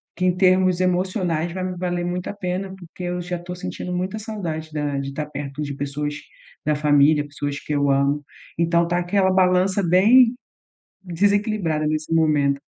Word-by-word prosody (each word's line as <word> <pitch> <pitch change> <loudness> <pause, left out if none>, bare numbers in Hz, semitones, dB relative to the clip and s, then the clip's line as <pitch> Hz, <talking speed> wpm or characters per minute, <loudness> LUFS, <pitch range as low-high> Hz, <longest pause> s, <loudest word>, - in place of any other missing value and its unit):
que 185 - -4
em 180 - +3
termos 185 -1 +3
emocionais 180 -2 0
vai 185 - -4
me 180 -1 -4
valer 175 -1 -2
muito 180 +1 -3
a - - -4
pena, 190 0 -4
porque 180 0 -11
eu 180 0 -2
já 175 0 -4
tô 180 +1 -7
sentindo 180 0 -5
muita 185 +4 -2
saudade 170 -8 -5
da 145 -2 -2
de 135 0 -5
tá 150 +2 -3
perto 145 0 -6
de 145 -1 -4
pessoas 145 +1 -3 0.5
da 150 - +2
família, 145 0 +4
pessoas 145 0 -4
que 150 - -5
eu 140 -1 +2
amo. 140 +2 +1 0.3
Então 170 +1 +2
tá 175 0 0
aquela 190 +2 +1
balança 185 +1 +3
bem 220 +8 +5 0.7
desequilibrada 195 -3 0
nesse 155 +1 -2
momento. 145 -4 +2
175 Hz, 175 wpm, -22 LUFS, 150-185 Hz, 0.7 s, bem